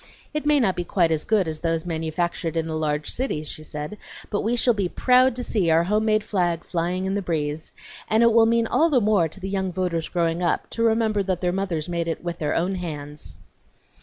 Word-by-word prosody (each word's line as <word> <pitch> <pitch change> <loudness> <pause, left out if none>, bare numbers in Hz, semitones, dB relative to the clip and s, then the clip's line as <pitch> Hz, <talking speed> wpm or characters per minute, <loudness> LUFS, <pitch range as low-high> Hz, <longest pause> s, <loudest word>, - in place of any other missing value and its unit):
"It 300 -1 -2
may 300 -1 +5
not 195 -7 +2
be 175 - -2
quite 170 -1 +1
as 155 -1 0
good 210 -5 +2
as 155 -1 -4
those 165 0 -1
manufactured 165 0 -2
in 165 - 0
the 160 -1 -3
large 150 -1 -1
cities," 195 - -2
she 155 - -4
said, 150 +6 -6 0.3
"but 205 - 0
we 230 +3 0
shall 240 0 +3
be 200 -4 -1
proud 255 +2 +4
to 250 - -3
see 195 -8 0
our 165 +1 +4
home 210 +4 +1
made 215 -1 +2
flag 175 -5 0
flying 180 +2 -2
in 190 - -1
the 200 - 0
breeze, 155 -3 -3 0.4
and 220 +2 +3
it 235 -1 +5
will 225 0 +6
mean 230 0 +3
all 325 +8 +3
the 275 -5 +4
more 205 -6 +3
to 165 - -13
the 190 - -5
young 190 -1 -1
voters 175 -3 -2
growing 170 -1 0
up, 175 - 0
to 230 - -3
remember 220 -2 +2
that 185 -2 -1
their 180 -1 0
mothers 185 -5 -2
made 170 -1 -2
it 165 - -3
with 170 -1 -4
their 150 - -1
own 180 +3 0
hands." 150 -5 -6
180 Hz, 235 wpm, -24 LUFS, 165-215 Hz, 0.4 s, will